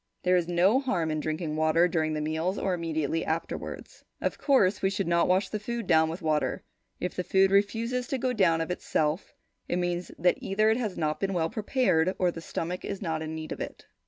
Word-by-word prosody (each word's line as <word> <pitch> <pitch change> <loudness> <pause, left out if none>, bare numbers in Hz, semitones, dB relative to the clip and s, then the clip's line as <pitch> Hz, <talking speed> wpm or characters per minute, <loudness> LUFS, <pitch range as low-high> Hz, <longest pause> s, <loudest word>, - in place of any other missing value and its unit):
There 180 0 +4
is 175 -2 +1
no 180 +8 +4
harm 180 - -1
in 155 - -1
drinking 155 0 -3
water 160 +2 +4
during 160 -2 0
the 150 - -2
meals 160 +5 -1
or 190 - 0
immediately 165 -2 -1
afterwards. 160 +1 -5 0.2
Of - - -2
course, 235 -9 +3
we 190 - +2
should 195 -1 -2
not 170 0 +3
wash 185 +1 +2
the 215 - -3
food 235 +2 -4
down 160 -1 +4
with 165 +3 -6
water. 155 -1 0 0.4
If 180 - -2
the 180 - -2
food 190 +1 +3
refuses 230 +5 +1
to 270 - -1
go 255 0 0
down 170 -7 +3
of 165 - -2
itself, 160 -1 -1 0.3
it 175 - -1
means 175 0 -1
that 180 +2 +2
either 215 +3 +2
it 225 - +2
has 220 -7 -3
not 155 -1 -1
been 195 0 -1
well 165 -1 0
prepared 200 -6 +1
or 180 -1 +2
the 165 - -8
stomach 175 +2 -4
is 200 - -4
not 160 -5 -2
in 160 0 -4
need 155 0 -6
of - - -4
it. - - -7
180 Hz, 220 wpm, -28 LUFS, 160-200 Hz, 0.4 s, There